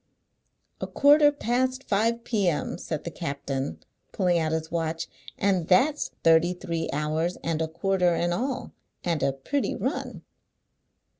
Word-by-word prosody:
"A -, -, -2 dB
quarter 290 Hz, +1 st, +6 dB
past 255 Hz, -1 st, -1 dB
five 230 Hz, +3 st, +1 dB
p.m.," 190 Hz, -8 st, 0 dB
said 155 Hz, -4 st, -4 dB
the 170 Hz, -, -5 dB
captain, 140 Hz, -4 st, -4 dB, 0.3 s
pulling 180 Hz, -3 st, +2 dB
out 160 Hz, -1 st, 0 dB
his 160 Hz, 0 st, -2 dB
watch, 165 Hz, -1 st, -2 dB, 0.3 s
"and 190 Hz, -4 st, +1 dB
that's 280 Hz, +11 st, +3 dB
thirty 165 Hz, +2 st, +5 dB
three 165 Hz, -2 st, -3 dB
hours 155 Hz, +4 st, -1 dB
and 165 Hz, -1 st, -1 dB
a 160 Hz, -, 0 dB
quarter 180 Hz, +1 st, +1 dB
in 175 Hz, +1 st, 0 dB
all, 255 Hz, +5 st, -2 dB, 0.3 s
and 170 Hz, -4 st, 0 dB
a 140 Hz, -, +2 dB
pritty 200 Hz, -, -2 dB
run!" -, -, -3 dB
175 Hz, 140 wpm, -26 LUFS, 160-230 Hz, 0.3 s, quarter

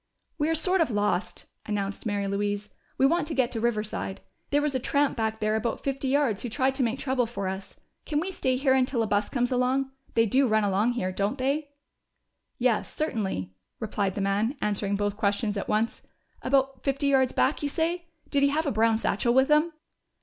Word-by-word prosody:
"We're 315 Hz, +2 st, +2 dB
sort 365 Hz, +3 st, +2 dB
of 320 Hz, -, +2 dB
lost," 205 Hz, -4 st, -1 dB, 0.2 s
announced 205 Hz, 0 st, -3 dB
Mary 205 Hz, -1 st, -1 dB
Louise. 205 Hz, +1 st, -2 dB, 0.3 s
"We 265 Hz, -, +4 dB
want 335 Hz, +3 st, +2 dB
to 310 Hz, -, -3 dB
get 255 Hz, -2 st, +2 dB
to 230 Hz, -, -2 dB
Riverside. 215 Hz, -4 st, -2 dB, 0.3 s
There 290 Hz, -, +3 dB
was 295 Hz, -1 st, 0 dB
a 260 Hz, -, 0 dB
tramp 285 Hz, +3 st, +1 dB
back 220 Hz, -1 st, -1 dB
there 215 Hz, 0 st, +1 dB
about 225 Hz, +1 st, -2 dB
fifty 275 Hz, 0 st, -2 dB
yards 260 Hz, -7 st, +2 dB
who 245 Hz, -, -4 dB
tried 265 Hz, +3 st, +1 dB
to 265 Hz, -, -2 dB
make 235 Hz, +2 st, 0 dB
trouble 260 Hz, -3 st, 0 dB
for 200 Hz, -4 st, -4 dB
us. 190 Hz, +1 st, -5 dB, 0.3 s
Can 295 Hz, -2 st, +1 dB
we 375 Hz, +4 st, -2 dB
stay 260 Hz, -8 st, 0 dB
here 265 Hz, 0 st, +3 dB
until 255 Hz, -2 st, +2 dB
a -, -, 0 dB
bus 205 Hz, -1 st, 0 dB
comes 245 Hz, -1 st, 0 dB
along 260 Hz, +2 st, +1 dB, 0.2 s
they 230 Hz, -, +5 dB
do 260 Hz, +5 st, +3 dB
run 215 Hz, -1 st, +3 dB
along 205 Hz, +4 st, +2 dB
here, 185 Hz, -6 st, -2 dB
don't 200 Hz, +7 st, -1 dB
they?" 280 Hz, +3 st, -1 dB, 0.9 s
"Yes, 240 Hz, -3 st, +1 dB
certainly," 195 Hz, -, -2 dB, 0.3 s
replied 205 Hz, -4 st, -1 dB
the 200 Hz, -, -2 dB
man, 205 Hz, +7 st, 0 dB
answering 205 Hz, -1 st, 0 dB
both 205 Hz, 0 st, -1 dB
questions 205 Hz, 0 st, 0 dB
at 200 Hz, -, -4 dB
once. 220 Hz, +2 st, 0 dB, 0.4 s
"About 270 Hz, 0 st, +1 dB
fifty 275 Hz, +1 st, 0 dB
yards 265 Hz, -2 st, +3 dB
back, 270 Hz, -, +1 dB
you 290 Hz, -, -1 dB
say? 340 Hz, +3 st, -1 dB, 0.2 s
Did 280 Hz, -, +2 dB
he 280 Hz, -, +5 dB
have 310 Hz, +3 st, 0 dB
a 285 Hz, -, +1 dB
brown 225 Hz, 0 st, +3 dB
satchel 235 Hz, +2 st, +1 dB
with 265 Hz, +2 st, +4 dB
him?" 305 Hz, +3 st, +4 dB
240 Hz, 205 wpm, -27 LUFS, 210-275 Hz, 0.9 s, they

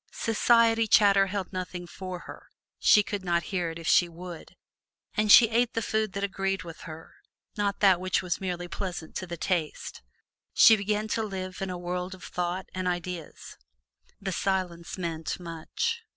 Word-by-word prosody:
Society 230 Hz, 0 st, +3 dB
chatter 200 Hz, -2 st, +5 dB
held 195 Hz, -1 st, -4 dB
nothing 180 Hz, -1 st, -5 dB
for 185 Hz, 0 st, -7 dB
her, -, -, -11 dB, 0.3 s
she 210 Hz, -, +6 dB
could 200 Hz, -1 st, -4 dB
not 170 Hz, -1 st, +1 dB
hear 175 Hz, -3 st, 0 dB
it 165 Hz, -, -7 dB
if 165 Hz, -1 st, -7 dB
she 175 Hz, -, +4 dB
would; 170 Hz, 0 st, -10 dB, 0.6 s
and 215 Hz, -1 st, +2 dB
she 230 Hz, +5 st, +10 dB
ate 235 Hz, +1 st, +1 dB
the 230 Hz, -, 0 dB
food 220 Hz, -3 st, -1 dB
that 200 Hz, -, -3 dB
agreed 195 Hz, 0 st, -1 dB
with 165 Hz, -2 st, -10 dB
her, 160 Hz, +1 st, -10 dB, 0.4 s
not 205 Hz, -1 st, -1 dB
that 190 Hz, -3 st, +5 dB
which 185 Hz, +1 st, 0 dB
was 180 Hz, 0 st, -2 dB
merely 175 Hz, -2 st, -3 dB
pleasant 175 Hz, -3 st, -5 dB
to 185 Hz, -, -4 dB
the 170 Hz, 0 st, -6 dB
taste. 165 Hz, -2 st, -2 dB, 0.5 s
She 225 Hz, -, +8 dB
began 210 Hz, +1 st, -1 dB
to 225 Hz, -, 0 dB
live 190 Hz, -3 st, -5 dB
in 195 Hz, -, -2 dB
a 180 Hz, -, -4 dB
world 180 Hz, +1 st, -4 dB
of 185 Hz, -, -16 dB
thought 180 Hz, +1 st, -3 dB
and 185 Hz, 0 st, -3 dB
ideas. 175 Hz, -2 st, -5 dB, 0.6 s
The 195 Hz, -1 st, -4 dB
silence 180 Hz, -2 st, -2 dB
meant 165 Hz, -2 st, -4 dB
much. 180 Hz, -, -3 dB
185 Hz, 175 wpm, -27 LUFS, 175-205 Hz, 0.6 s, she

